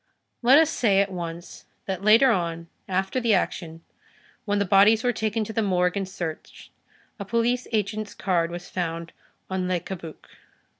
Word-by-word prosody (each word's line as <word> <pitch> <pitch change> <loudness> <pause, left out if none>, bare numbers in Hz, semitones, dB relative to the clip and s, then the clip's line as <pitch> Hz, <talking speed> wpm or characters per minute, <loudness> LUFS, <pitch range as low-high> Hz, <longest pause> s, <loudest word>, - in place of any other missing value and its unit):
Let 255 +3 +6
us 320 0 +4
say 205 -9 +2
at 200 0 +1
once 170 -1 -7 0.2
that 190 -1 -4
later 225 +5 +6
on, 170 -4 -2 0.2
after 190 +6 0
the 230 -4 +3
action, 165 -3 -3 0.6
when 205 0 0
the 200 - +1
bodies 205 +3 +5
were 245 -1 +1
taken 220 0 -1
to 220 - -6
the 225 - 0
morgue 180 -3 +1
and 195 -2 -3
searched, 170 -4 -7 0.5
a - - -3
police 235 +4 0
agent's 215 -1 -2
card 170 -3 0
was 175 +1 -7
found 170 -2 -4 0.3
on 185 -1 -2
Le 180 -1 0
Cabuc. 170 -2 -9
195 Hz, 165 wpm, -25 LUFS, 175-220 Hz, 0.6 s, Let